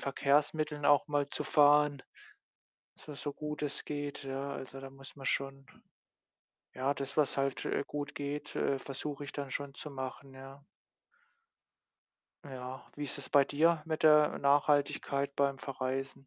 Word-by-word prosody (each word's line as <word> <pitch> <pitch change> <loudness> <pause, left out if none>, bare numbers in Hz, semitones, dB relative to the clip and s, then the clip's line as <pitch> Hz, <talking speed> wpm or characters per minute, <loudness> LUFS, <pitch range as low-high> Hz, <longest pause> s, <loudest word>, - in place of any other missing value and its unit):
Verkehrsmitteln 150 +2 +1
auch 145 +1 +5
mal 145 -1 +1
zu - - -3
fahren, 145 -1 +5 0.9
zwar 150 -2 -10
so 145 0 -4
gut 150 0 -5
es 145 -1 -2
geht, 145 -1 -4
ja. 135 +1 -4
Also 135 -1 -7
da 135 - -8
muss 135 0 -13
man 135 -2 -9
schon 135 0 -1 1.1
ja, 135 +2 0
das, 140 +1 -6
was 150 -2 +3
halt, 135 0 -1
äh, - - 0
gut 145 -1 -5
geht, 145 +1 -4
äh, 135 - +1
versuche 145 +2 -5
ich 140 - -7
dann 140 -2 -5
schon 140 0 -4
zu 150 - -8
machen, 135 0 -6
ja. 135 +1 -11 1.8
Ja, 130 -1 -7
wie 145 - -3
ist 140 - -5
das 140 - -8
bei 140 -1 +6
dir 160 +4 +3
mit 160 -1 -3
der 150 -1 +6
Nachhaltigkeit 140 -1 +2
beim 140 -1 +1
Verreisen? 135 0 -4
140 Hz, 155 wpm, -32 LUFS, 135-145 Hz, 1.8 s, bei